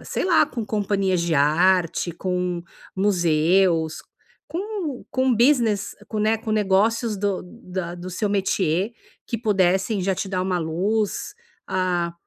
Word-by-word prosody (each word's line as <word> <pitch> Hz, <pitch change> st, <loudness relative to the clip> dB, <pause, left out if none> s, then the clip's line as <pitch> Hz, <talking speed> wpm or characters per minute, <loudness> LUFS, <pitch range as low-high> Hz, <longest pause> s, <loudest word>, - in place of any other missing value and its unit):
sei -, -, -2 dB
lá 345 Hz, -4 st, +5 dB
com 235 Hz, -6 st, -5 dB
companhias 200 Hz, -3 st, 0 dB
de 170 Hz, -2 st, 0 dB
arte, 170 Hz, +4 st, +2 dB
com 180 Hz, -1 st, -2 dB, 0.3 s
museus 170 Hz, -3 st, +2 dB, 0.4 s
com 345 Hz, -, -4 dB
com 260 Hz, -1 st, +2 dB
business 235 Hz, -4 st, +2 dB
com 215 Hz, -, -3 dB
né, 215 Hz, +1 st, +2 dB
com 220 Hz, 0 st, -6 dB
negócios 215 Hz, +2 st, +2 dB
do 200 Hz, -1 st, -1 dB
da 180 Hz, -3 st, -6 dB
do 180 Hz, +1 st, -7 dB
seu 205 Hz, +3 st, -1 dB
métier 195 Hz, 0 st, 0 dB, 0.3 s
que 230 Hz, -, -3 dB
pudessem 195 Hz, -1 st, +1 dB
já 190 Hz, +1 st, +1 dB
te 190 Hz, -, -4 dB
dar 185 Hz, -1 st, -1 dB
uma 185 Hz, -1 st, 0 dB
luz. 195 Hz, -, -1 dB, 0.3 s
Ah, 175 Hz, -2 st, 0 dB
190 Hz, 135 wpm, -23 LUFS, 180-220 Hz, 0.4 s, lá